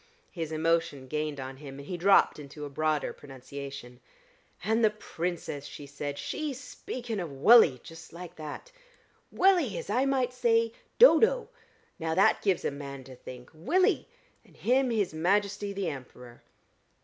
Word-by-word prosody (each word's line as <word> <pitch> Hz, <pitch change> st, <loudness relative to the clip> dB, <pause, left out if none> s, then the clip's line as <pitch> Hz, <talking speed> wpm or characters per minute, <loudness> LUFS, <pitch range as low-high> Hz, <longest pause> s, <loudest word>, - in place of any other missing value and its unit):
His 165 Hz, -3 st, -5 dB
emotion 160 Hz, -4 st, 0 dB
gained 150 Hz, 0 st, -3 dB
on 130 Hz, 0 st, -6 dB
him, 135 Hz, -1 st, -10 dB
and 140 Hz, 0 st, -10 dB
he 180 Hz, -, -3 dB
dropped 195 Hz, -1 st, +4 dB
into 145 Hz, +1 st, -8 dB
a 145 Hz, -, -8 dB
broader 155 Hz, +1 st, 0 dB
pronunciation. 135 Hz, -2 st, -9 dB, 0.6 s
"And 225 Hz, +2 st, +1 dB
the 220 Hz, -, +6 dB
Princess!" 175 Hz, -8 st, -5 dB
he 145 Hz, -, -9 dB
said. 145 Hz, 0 st, -5 dB
"She 300 Hz, -, -3 dB
speaking 245 Hz, -3 st, -6 dB
of 175 Hz, -3 st, -4 dB
Wullie, 140 Hz, -, +6 dB
just 165 Hz, 0 st, -12 dB
like 175 Hz, 0 st, -9 dB
that. 155 Hz, -, -8 dB, 0.6 s
'Wullie,' 380 Hz, +2 st, +3 dB
as -, -, -5 dB
I 260 Hz, +2 st, +2 dB
might 260 Hz, -2 st, +1 dB
say 230 Hz, -2 st, +2 dB, 0.2 s
'Dodo.' 475 Hz, +2 st, +6 dB, 0.5 s
Now 160 Hz, 0 st, -1 dB
that 190 Hz, -, +4 dB
gives 190 Hz, -4 st, +1 dB
a -, -, +1 dB
man 140 Hz, -1 st, -8 dB
to 130 Hz, 0 st, -12 dB
think. 125 Hz, 0 st, -11 dB
Wullie! 360 Hz, -, +1 dB, 0.4 s
And -, -, -22 dB
him 255 Hz, +2 st, +2 dB
his 210 Hz, -8 st, 0 dB
Majesty 200 Hz, +5 st, 0 dB
the 195 Hz, -3 st, -2 dB
Emperor!" 125 Hz, -3 st, -10 dB
165 Hz, 155 wpm, -29 LUFS, 140-230 Hz, 0.6 s, the